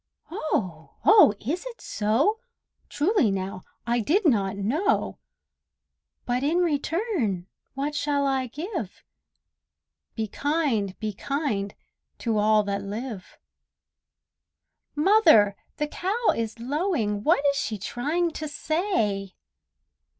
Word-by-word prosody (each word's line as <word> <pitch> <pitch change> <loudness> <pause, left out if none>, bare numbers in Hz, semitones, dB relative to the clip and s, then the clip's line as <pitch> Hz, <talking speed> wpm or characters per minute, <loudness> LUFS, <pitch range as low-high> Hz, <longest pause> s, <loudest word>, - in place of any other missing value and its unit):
Oh! 185 - -3
oh! 400 - +7
is 315 +11 -3
it - - -8
so? 245 - +1 0.5
Truly 315 - +2
now, 190 -1 -3 0.2
I 240 0 +1
did 355 - +1
not 200 - +2
know! 285 - 0 1.1
But 245 +1 0
in 310 +5 +2
return 315 - 0 0.3
what 285 +2 -2
shall 290 -1 0
I 265 -2 0
give? 305 - -6 1.1
"Be 220 -1 -2
kind, 260 - -1
be 215 -1 -3
kind, 215 -5 -2 0.4
to 225 -3 0
all 215 0 +4
that 200 0 -2
live!" 205 0 -6 1.6
Mother, 300 - +5 0.2
the 300 - -1
cow 405 +9 0
is 225 0 -3
lowing; 245 - -1
What 295 -1 +3
is - - -4
she 215 -3 -2
trying 295 - -1
to 310 0 -5
say? 260 - -1
265 Hz, 110 wpm, -26 LUFS, 210-325 Hz, 1.6 s, oh